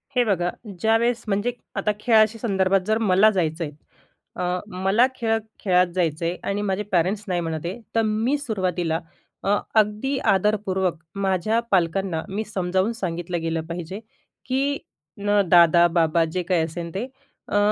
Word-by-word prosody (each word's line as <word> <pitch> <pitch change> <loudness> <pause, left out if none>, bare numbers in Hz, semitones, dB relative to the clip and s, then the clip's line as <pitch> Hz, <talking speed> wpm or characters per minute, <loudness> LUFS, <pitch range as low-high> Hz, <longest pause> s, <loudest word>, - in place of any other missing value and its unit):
हे 245 - +4
बघा, 180 -4 +1 0.3
ज्यावेळेस 225 +3 +2
म्हणजे 205 +4 0 0.2
आता 210 - +1
खेळाशी 220 -1 +4
संदर्भात, 195 -3 +2
जर 220 0 +2
मला 210 -1 +4
जायचं 170 -3 -1
आहे. 150 - -5 0.6
अ, 180 0 -1 0.2
मला 210 +6 +4
खेळत 225 -2 0 0.2
खेळात 180 -2 +3
जायचं 165 -2 0
आहे 175 +2 -1
आणि 205 +1 -1
माझे 200 0 -1
पॅरेंट्स 190 +4 +1
नाही 180 -2 0
म्हणत 160 -1 -4
आहे, 185 +7 -4 0.2
तर 225 - +4
मी 225 +7 +1
सुरुवातीला 185 - -1 0.4
अ, 195 - -1 0.3
अगदी 215 +6 0
आदरपूर्वक 190 -2 +1 0.2
माझ्या 195 +3 +1
पालकांना 180 -1 +1
मी 210 +3 -2
समजावून 190 0 0
सांगितलं 175 -4 -3
गेलं 165 0 -1
पाहिजे 175 +4 -6 0.5
की 275 +2 0 0.4
न 205 0 +2
दादा, 170 0 +6
बाबा, 165 -1 +2
जे 165 +3 -3
काही 175 -2 +1
असेल 170 +1 -5
ते, 200 - -1 0.4
अ, 205 - 0
190 Hz, 150 wpm, -23 LUFS, 175-215 Hz, 0.6 s, दादा